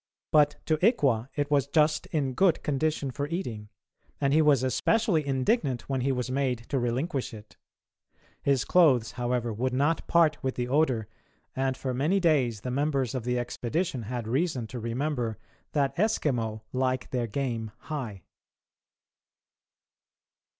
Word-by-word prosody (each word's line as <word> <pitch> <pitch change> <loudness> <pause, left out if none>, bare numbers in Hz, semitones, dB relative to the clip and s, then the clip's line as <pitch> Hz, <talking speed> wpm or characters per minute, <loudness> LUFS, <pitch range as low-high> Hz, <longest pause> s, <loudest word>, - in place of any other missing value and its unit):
But 150 -1 +4
to 155 - +2
Ikwa 135 - +3
it 145 0 -1
was 140 -2 +3
just 155 +1 +2
in 140 -4 -1
good 180 +2 +2
condition 150 -1 -1
for 140 +3 -3
eating, 120 - -4 0.5
and 140 -1 +1
he 160 - +5
was 145 -4 +4
especially 185 - +2
indignant 135 - 0
when 135 -2 -1
he 135 +2 +1
was 125 -1 -2
made 130 -3 0
to 135 - 0
relinquish 125 +2 -2
it. 105 0 -13 0.9
His 135 -6 +1
clothes, 140 -10 +4
however, 120 -1 -1
would 125 +4 -1
not 145 +5 +1
part 160 -3 +3
with 130 -1 -2
the 125 0 -2
odour, 130 -6 +1 0.5
and 130 0 0
for 130 -2 -3
many 155 +10 +1
days 135 - +2
the 125 - -4
members 140 -2 0
of 125 -3 -3
the 125 0 0
expedition 125 +4 -2
had 115 +1 -4
reason 130 0 0
to 125 - -6
remember 120 0 -2 0.4
that 140 -2 +1
Eskimo 125 - 0
like 130 0 -1
their 125 -2 -1
game 115 -2 -2
high. 120 - -5
135 Hz, 150 wpm, -28 LUFS, 120-150 Hz, 0.9 s, he